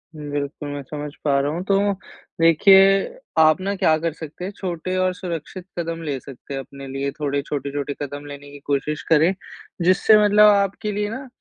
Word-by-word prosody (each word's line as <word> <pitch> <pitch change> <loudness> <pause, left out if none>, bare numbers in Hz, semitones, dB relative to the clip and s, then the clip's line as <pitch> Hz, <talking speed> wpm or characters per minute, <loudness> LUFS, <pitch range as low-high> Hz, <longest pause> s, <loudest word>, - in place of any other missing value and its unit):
बिल्कुल, 145 0 -5
मैं 145 0 -5
समझ 150 +1 -6
पा 140 -2 +2
रहा 140 +1 0
हूँ। 170 +3 -3
तो, 200 0 +2 0.5
देखिए, 195 - +5 0.2
आप 155 +2 +5
ना 200 +1 -2
क्या 165 -5 +3
कर 165 0 -2
सकते 160 +3 -8
हैं? 195 - -4
छोटे 185 0 -4
और 185 0 +1
सुरक्षित 175 0 -6
कदम 165 0 -3
ले 140 -4 -3
सकते 135 +1 -11
हैं 135 - -3
अपने 140 +1 -11
लिए, 135 +1 -3
थोड़े 145 -1 -1
छोटे-छोटे 145 0 -4
कदम 145 0 -6
लेने 145 0 -10
की 145 - -11
कोशिश 145 +2 -1
करें, 160 +4 +5 0.5
जिससे 185 +4 +5
मतलब 210 +1 +6
आपके 200 +1 0
लिए 205 0 -2
ना, 260 +4 -6
160 Hz, 185 wpm, -22 LUFS, 145-190 Hz, 0.5 s, मतलब